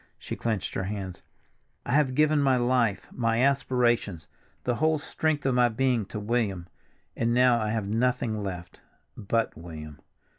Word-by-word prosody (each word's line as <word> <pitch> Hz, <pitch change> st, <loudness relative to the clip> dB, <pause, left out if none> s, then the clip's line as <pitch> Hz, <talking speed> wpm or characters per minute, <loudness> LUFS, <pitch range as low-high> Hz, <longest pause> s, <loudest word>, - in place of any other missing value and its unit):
She -, -, -6 dB
clenched 110 Hz, -4 st, -2 dB
her 95 Hz, -, -2 dB
hands. 95 Hz, -2 st, -5 dB, 0.6 s
"I -, -, -3 dB
have 135 Hz, -2 st, +2 dB
given 150 Hz, 0 st, +3 dB
my 135 Hz, -2 st, +3 dB
life, 120 Hz, -4 st, +1 dB
my 115 Hz, -2 st, 0 dB
aspirations, 120 Hz, -, +1 dB, 0.4 s
the 125 Hz, -2 st, 0 dB
whole 155 Hz, +1 st, +2 dB
strength 155 Hz, 0 st, -1 dB
of 135 Hz, -, +2 dB
my 125 Hz, -1 st, +4 dB
being, 120 Hz, -3 st, 0 dB
to 105 Hz, -, -5 dB
William, 105 Hz, -5 st, -1 dB, 0.5 s
and 115 Hz, +1 st, +1 dB
now 125 Hz, -1 st, +5 dB
I 110 Hz, -, -1 dB
have 110 Hz, -2 st, -1 dB
nothing 115 Hz, 0 st, 0 dB
left—but 95 Hz, +4 st, -4 dB
William." 75 Hz, -4 st, -9 dB
115 Hz, 150 wpm, -27 LUFS, 100-130 Hz, 0.6 s, now